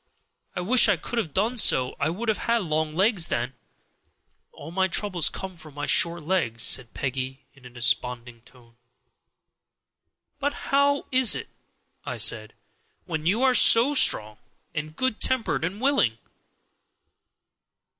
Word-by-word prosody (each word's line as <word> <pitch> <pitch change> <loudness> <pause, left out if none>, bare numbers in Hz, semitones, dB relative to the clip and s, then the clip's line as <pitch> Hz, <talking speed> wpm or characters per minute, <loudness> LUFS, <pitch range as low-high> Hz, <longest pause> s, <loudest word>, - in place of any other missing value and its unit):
I 180 - -3
wish 235 +4 +3
I 200 - +2
could 235 +7 -4
have 170 -9 -4
done 220 - -1
so; 130 -10 +3
I 145 - 0
would 210 +8 -5
have 220 - 0
had 235 -2 +2
long 155 -2 -2
legs 190 -2 +3
then. 120 +3 -3 1.0
All 160 - -11
my 190 +2 0
troubles 185 -3 0
come 190 -1 -8
from 155 -3 -14
my 145 - -4
short 170 -1 +3
legs," 150 -10 -1
said 120 0 +1
Peggy, 135 +1 -5
in 135 -3 -21
a - - -13
desponding 120 0 -1
tone. 120 -1 -22 1.6
"But 285 0 -1 0.2
how 280 0 +2
is 260 -3 +2
it," - - -7 0.5
I - - -6
said, - - 0 0.5
"when 160 -2 -4
you 215 +8 +1
are 260 -1 +4
so 245 +3 +5
strong 110 - +2 0.4
and 155 -1 -6
good 260 -1 -2
tempered 260 -10 0
and 185 +5 -4
willing?" 260 - +1
170 Hz, 145 wpm, -24 LUFS, -, 1.6 s, so